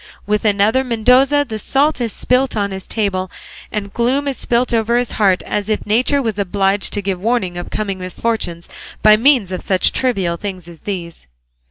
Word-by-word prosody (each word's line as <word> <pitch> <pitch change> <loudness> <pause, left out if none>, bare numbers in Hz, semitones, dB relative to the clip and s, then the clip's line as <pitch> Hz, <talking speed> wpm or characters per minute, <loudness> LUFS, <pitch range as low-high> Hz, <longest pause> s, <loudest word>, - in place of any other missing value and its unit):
With 210 +1 0
another 210 +5 +3
Mendoza 255 +4 +3
the 220 -2 -5
salt 280 +4 +1
is 230 -2 -1
spilt 255 +1 +1
on 200 -1 -1
his 190 -1 -7
table, 190 -4 -1 0.4
and 200 -2 -4
gloom 260 +5 0
is 275 - -1
spilt 240 +1 0
over 230 +1 +2
his 245 -1 -1
heart, 195 -4 +2
as 205 0 -3
if 215 - -1
nature 255 +6 +2
was 220 -3 -2
obliged 195 +1 0
to 205 - -2
give 185 -2 -2
warning 210 -5 0
of 175 - -6
coming 195 -3 -3
misfortunes 185 -2 -3 0.4
by 215 0 +8
means 235 -4 +3
of 185 - -3
such 185 -2 +2
trivial 195 -10 -1
things 185 -2 -6
as 170 -2 -12
these. 170 - -6
210 Hz, 185 wpm, -18 LUFS, 190-245 Hz, 0.4 s, by